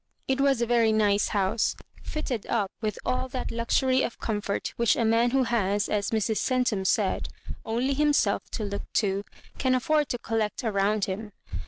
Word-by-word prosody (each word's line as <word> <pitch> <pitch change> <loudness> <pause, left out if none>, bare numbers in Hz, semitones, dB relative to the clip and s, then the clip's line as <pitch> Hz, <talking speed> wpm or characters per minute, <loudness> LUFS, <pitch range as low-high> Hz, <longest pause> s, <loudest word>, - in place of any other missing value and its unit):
It 265 0 +1
was 275 -4 +3
a - - +2
very 230 -2 +3
nice 205 -2 +3
house, 200 +2 +1 0.3
fitted 255 -8 -4
up 205 -4 0
with 215 -2 -2
all 255 +1 0
that 255 0 -4
luxury 255 +3 +2
of 240 - -2
comfort 205 -2 -2
which 235 -1 +3
a 230 - +1
man 230 +2 +3
who 265 +1 +2
has, 210 -3 +1
as 205 -1 0
Mrs. 220 -1 0
Centum 245 -7 +1
said, - - +1 0.3
"only 240 +5 0
himself 295 +1 +2
to 220 - -2
look 200 -1 -5
to," 200 -2 +1 0.4
can 260 -1 +2
afford 300 +3 +1
to 245 - -1
collect 225 +1 -2
around 205 -1 +1
him. 205 +2 -5
225 Hz, 175 wpm, -27 LUFS, 205-255 Hz, 0.4 s, was